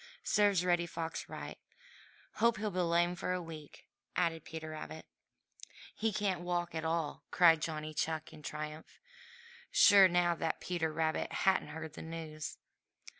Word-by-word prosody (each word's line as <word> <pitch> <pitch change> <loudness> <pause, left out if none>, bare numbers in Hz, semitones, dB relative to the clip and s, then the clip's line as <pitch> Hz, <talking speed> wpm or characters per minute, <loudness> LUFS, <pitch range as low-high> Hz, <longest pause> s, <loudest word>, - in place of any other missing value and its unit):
Serves 200 -4 +3
Reddy 175 -1 +2
Fox 165 -1 -5
right. - - -7 0.8
Hope 235 +1 +3
he'll 210 0 -2
be 185 - -2
lame 175 0 +2
for 180 - -2
a 180 - -1
week," 160 -4 -10 0.3
added 165 -3 0
Peter 160 -1 -7
Rabbit. 155 0 -7 0.9
"He 225 0 0
can't 195 -3 -1
walk 175 -1 -2
at 160 -1 -3
all!" 160 -2 -1
cried 165 -3 +6
Johnny 155 -1 -3
Chuck 160 +1 -2
in 155 - -12
triumph, 150 +1 -7 0.7
sure 200 -2 +8
now 175 -1 +3
that 165 -1 -2
Peter 170 -3 -1
Rabbit 160 0 -1
hadn't 190 0 +2
heard 160 +1 -7
the - - -8
news. 160 -2 -6
165 Hz, 150 wpm, -33 LUFS, 160-180 Hz, 0.9 s, sure